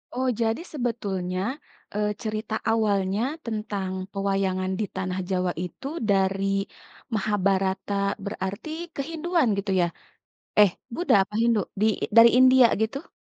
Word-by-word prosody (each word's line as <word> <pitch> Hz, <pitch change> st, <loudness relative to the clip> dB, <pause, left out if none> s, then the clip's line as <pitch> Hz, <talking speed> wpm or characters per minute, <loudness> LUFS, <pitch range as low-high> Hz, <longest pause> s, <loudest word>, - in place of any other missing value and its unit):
Oh 260 Hz, +1 st, 0 dB
jadi 225 Hz, +7 st, +1 dB
sebetulnya, 200 Hz, -9 st, -2 dB, 0.5 s
eee, 210 Hz, 0 st, 0 dB
cerita 215 Hz, 0 st, -3 dB, 0.2 s
awalnya 200 Hz, -2 st, +1 dB, 0.2 s
tentang 210 Hz, -4 st, -3 dB, 0.2 s
pewayangan 195 Hz, -1 st, 0 dB
di 215 Hz, -, +1 dB
tanah 185 Hz, 0 st, -2 dB
Jawa 185 Hz, -1 st, +1 dB
itu 265 Hz, +10 st, -7 dB, 0.2 s
dari 195 Hz, 0 st, +2 dB, 0.7 s
Mahabharata 195 Hz, -1 st, 0 dB, 0.3 s
berarti 200 Hz, +5 st, -4 dB, 0.3 s
ke -, -, -1 dB
Hinduan 330 Hz, -2 st, +1 dB
gitu 200 Hz, 0 st, -2 dB
ya? -, -, +4 dB, 0.7 s
Eh, 205 Hz, -2 st, +8 dB, 0.2 s
Buddha 350 Hz, -3 st, +2 dB
apa 210 Hz, -, -16 dB
Hindu? 230 Hz, -2 st, +3 dB, 0.2 s
Di -, -, +3 dB, 0.3 s
dari 230 Hz, 0 st, +10 dB
India 255 Hz, -1 st, +7 dB, 0.2 s
gitu? 275 Hz, +9 st, -3 dB
205 Hz, 125 wpm, -25 LUFS, 190-230 Hz, 0.7 s, dari